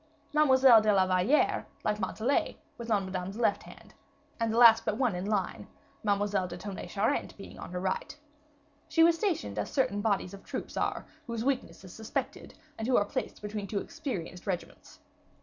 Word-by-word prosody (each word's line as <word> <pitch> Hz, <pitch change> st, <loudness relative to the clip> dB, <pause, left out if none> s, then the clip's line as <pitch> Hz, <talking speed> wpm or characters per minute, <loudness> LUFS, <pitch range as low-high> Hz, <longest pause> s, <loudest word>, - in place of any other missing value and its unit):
Mademoiselle 265 Hz, -6 st, +6 dB
de 215 Hz, 0 st, +3 dB
la 190 Hz, -2 st, +4 dB
Valliere, 185 Hz, +10 st, +2 dB, 0.2 s
like 210 Hz, -, 0 dB
Montalais, 220 Hz, +7 st, 0 dB, 0.2 s
was 235 Hz, -1 st, -8 dB
on 205 Hz, -3 st, +2 dB
Madame's 190 Hz, +2 st, -5 dB
left 235 Hz, -, +1 dB
hand, -, -, -14 dB, 0.5 s
and 230 Hz, -1 st, 0 dB
the 225 Hz, -, -1 dB
last 230 Hz, -2 st, +8 dB
but 215 Hz, -, -1 dB
one 245 Hz, -7 st, +1 dB
on 180 Hz, -, -3 dB
the -, -, -3 dB
line, 200 Hz, -4 st, -2 dB, 0.4 s
Mademoiselle 200 Hz, -2 st, +1 dB
de 175 Hz, 0 st, -7 dB
Tonnay 190 Hz, -2 st, -7 dB
Charente 200 Hz, +3 st, -1 dB
being 195 Hz, -, -11 dB
on -, -, -8 dB
her 180 Hz, -, -3 dB
right. 185 Hz, +9 st, -3 dB, 0.7 s
She 325 Hz, -, +4 dB
was 335 Hz, 0 st, +6 dB
stationed 335 Hz, -2 st, -2 dB
as -, -, -2 dB
certain 205 Hz, -7 st, 0 dB
bodies 200 Hz, -3 st, 0 dB
of 195 Hz, -, -11 dB
troops -, -, -6 dB
are, -, -, -1 dB, 0.2 s
whose 230 Hz, 0 st, -3 dB
weakness 265 Hz, -7 st, -2 dB
is 185 Hz, -, -11 dB
suspected, 220 Hz, -1 st, -5 dB, 0.2 s
and 225 Hz, -, -2 dB
who 255 Hz, -, +4 dB
are 205 Hz, -, +3 dB
placed 205 Hz, -, -5 dB
between 210 Hz, -1 st, -4 dB
two 205 Hz, -, -3 dB
experienced 185 Hz, -, -5 dB
regiments. 185 Hz, -3 st, -6 dB
210 Hz, 185 wpm, -30 LUFS, 190-235 Hz, 0.7 s, last